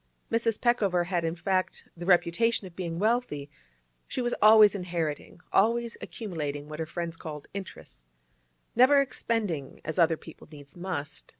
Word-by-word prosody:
Mrs. 230 -1 +1
Peckover 200 -8 +2
had, 175 -1 -1
in 165 0 -1
fact, 185 +2 -1
the 175 +1 -7
reputation 190 +5 +3
of 180 -2 -11
being 170 -3 -4
wealthy; 205 - 0 0.6
she - - -4
was 240 -1 0
always 215 -1 +8
inheriting, 175 -4 -4
always 230 +3 +2
accumulating 150 -9 -5
what 155 +1 -8
her 160 - -2
friends 170 0 -4
called 150 -3 -8
'interess,' 190 - -9 0.7
never 255 +4 +6
expending 225 - -2
as 155 +4 -3
other 165 -1 +4
people 160 - -13
needs 145 -2 -13
must. 175 -5 -5
180 Hz, 145 wpm, -28 LUFS, 160-220 Hz, 0.7 s, always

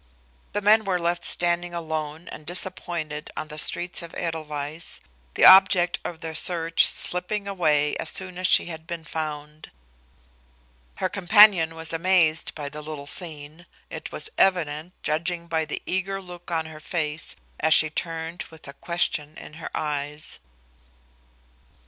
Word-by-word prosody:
The 205 0 -2
men 215 +2 +5
were 190 -3 0
left 170 0 -1
standing 175 0 +1
alone 160 0 -4
and 155 - -9
disappointed 170 -3 -2
on 155 - -4
the 150 0 -5
streets 175 +4 +3
of 170 -1 -10
Edelweiss, 155 -1 -3 0.4
the - - +5
object 185 -2 +7
of 170 -2 -6
their 160 -2 -5
search 165 0 +3
slipping 200 +3 -3
away 150 -6 +1
as - - -1
soon 185 -1 -4
as 185 - +1
she - - +4
had 160 -1 -8
been 170 -1 -5
found. 150 -1 -6 1.3
Her 185 - -1
companion 190 -3 +5
was 160 0 -2
amazed 165 -2 +2
by 145 -2 -5
the 150 +2 -7
little 150 -2 -7
scene, 155 +1 -3 0.2
it - - -7
was 440 - -5
evident, 170 -3 +1
judging 170 +2 -1
by 160 -1 -1
the 155 - -5
eager 195 +1 -2
look 180 -2 -11
on 165 -2 -1
her 155 -1 -10
face 155 -1 -3 0.2
as 160 0 +5
she 155 -1 +6
turned 165 +1 -4
with 160 -3 -14
a 140 - -8
question 160 -2 -1
in - - -11
her - - -5
eyes. 150 - -3
165 Hz, 150 wpm, -24 LUFS, 155-180 Hz, 1.3 s, object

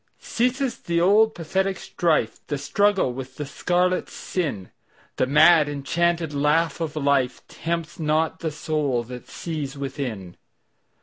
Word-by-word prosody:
Ceases 255 +2 -1
the 170 0 -1
old 210 +5 +4
pathetic 190 +3 -1
strife, 155 -10 0
The 145 - -2
struggle 195 0 +1
with 130 +1 -8
the 150 - -4
scarlet 180 +5 0
sin:The 130 - -5
mad 150 +2 +6
enchanted 165 +3 0
laugh 150 +3 +1
of 160 -3 -2
lifeTempts 155 +5 -1
not 160 +1 0
the 160 - -2
soul 150 -5 -1
that 125 +1 -9
sees 150 -4 -5
within. 125 - -5
155 Hz, 120 wpm, -24 LUFS, 140-175 Hz, -, mad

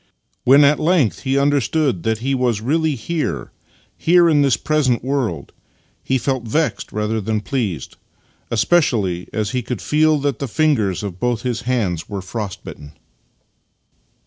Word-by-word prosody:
When 140 +3 +7
at 145 +1 +4
length 160 - +2
he 135 0 -1
understood 140 - +1
that 110 +3 0
he 135 - +1
was 125 -5 +1
really 155 +6 0
here 160 +6 -3 0.2
— - - -36
here 175 0 +6
in 150 -3 +4
this 135 -5 +3
present 140 -7 +1
world 125 - -2 0.3
— - - -40
he 130 - +1
felt 130 +1 -1
vexed 150 +8 -1
rather 105 +1 -1
than 110 +1 -1
pleased, 105 - -3 0.5
especially 110 - +1
as 105 -1 -2
he 125 - -1
could 120 -2 -4
feel 155 0 +2
that 140 -3 -1
the 140 - -3
fingers 110 - +1
of 95 -3 -6
both 120 -1 -1
his 125 -2 -2
hands 95 -10 -1
were 100 -2 -5
frostbitten. 95 -8 -7
125 Hz, 155 wpm, -19 LUFS, 105-145 Hz, 0.5 s, When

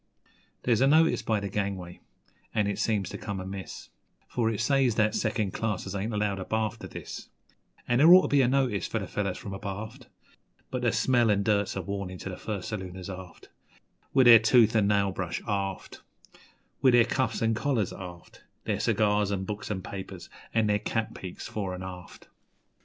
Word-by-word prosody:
There's 120 -1 +2
a 135 - +5
notice 160 +3 +4
by 110 -2 0
the 100 - -4
gangway, 95 -3 -4 0.6
an' 105 - +2
it 100 - -2
seems 105 -4 0
to - - -7
come 100 -3 -4
amiss, 95 0 -7 0.4
For 115 -2 0
it 110 -3 -3
says 130 0 +2
that 105 -1 +2
second 105 -6 -1
classers 105 -3 -3
'ain't 100 +3 -2
allowed 105 -2 -1
abaft 110 +2 -2
o' - - -5
this'; - - -8 0.6
An' 120 0 +2
there 160 +4 +8
ought 185 +1 +9
to - - 0
be 140 -1 +4
a 125 - +3
notice 125 -8 +1
for - - -2
the 100 - -3
fellows 100 -1 -2
from 100 - -7
abaft 105 +6 -7 0.6
But 125 - -2
the 120 -2 +2
smell 120 +1 +3
an' 100 -1 +2
dirt's 100 -1 +1
a 95 - -3
warnin' 100 0 -4
to - - -5
the 90 - -6
first 105 -2 -5
salooners, 95 -2 -6
aft; 95 -2 -10 0.6
With 130 -1 +4
their 115 -2 +10
tooth 115 0 +5
and 105 -3 +3
nail 100 -1 +2
brush, 95 -2 -3
aft, 100 -2 -3 0.8
With 130 -2 +5
their 120 -1 +6
cuffs 130 -1 -1
'n' 115 0 +2
collars, 120 -4 0
aft 90 -2 -11 0.2
Their - - -1
cigars 105 -2 +2
an' 95 -1 -1
books 105 +1 -5
an' 95 -3 -3
papers, 95 -2 -8 0.2
an' 110 -1 +2
their 105 0 +2
cap 115 +1 -2
peaks 95 -2 -8
fore 95 -4 -4
'n' 90 - -7
aft. 90 -1 -10
105 Hz, 190 wpm, -28 LUFS, 95-115 Hz, 0.8 s, their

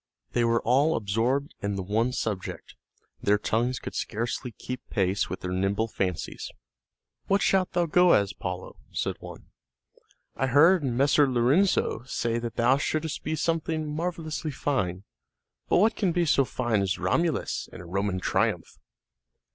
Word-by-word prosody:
They 120 - +1
were 115 0 +2
all 140 +7 +3
absorbed 115 +7 0
in 100 0 -2
the 95 - -3
one 110 +6 +1
subject; 105 -7 -4 0.5
their 105 +1 +3
tongues 120 +4 0
could - - -7
scarcely 120 +3 -3
keep 125 +3 -7
pace 95 -1 0
with 95 - -5
their 90 - -4
nimble 95 +4 0
fancies. 90 -6 -3 0.8
"What 200 +1 +2
shalt 190 -1 +2
thou 175 -1 +2
go 180 +2 +5
as, 100 -1 +2
Paolo?" 90 0 -6
said - - -2
one. - - -11 0.8
"I 135 - 0
heard 160 +6 +5
Messer 140 +2 +3
Lorenzo 130 +11 +2
say 115 -2 -1
that 115 -2 -5
thou 125 +3 +4
shouldst 155 +2 -2
be 155 - -2
something 160 -2 -1
marvelously 165 -2 -3
fine; 105 -10 -1 0.7
but - - +4
what 215 +5 +4
can 190 -5 +1
be 175 0 +1
so 140 -3 +3
fine 120 -5 0
as 95 -1 0
Romulus 145 - 0
in - - -10
a 90 - -9
Roman 95 +2 -1
triumph?" - - -1
125 Hz, 155 wpm, -27 LUFS, 100-155 Hz, 0.8 s, go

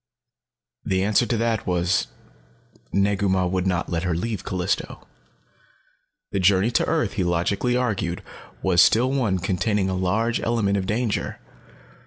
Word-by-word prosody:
The 95 0 0
answer 105 +4 +2
to 120 - 0
that 115 -1 -1
was 90 +1 +1 0.8
Negu 100 0 +1
Mah 95 -1 +2
would 90 +1 -1
not 90 -1 -1
let 85 -1 0
her 90 -2 -1
leave 110 +4 -3
Callisto. 90 -1 -3 1.3
The 100 - -1
journey 95 +4 +3
to - - +1
earth, 155 -11 0
he 95 - -1
logically 95 +8 0
argued, 100 -8 -2 0.4
was 90 -2 +4
still 125 +7 +4
one 120 -9 +1
containing 95 +2 0
a - - -1
large 100 +6 0
element 115 -4 +1
of 95 -1 -2
danger. 110 +1 -2
100 Hz, 145 wpm, -23 LUFS, 90-115 Hz, 1.3 s, was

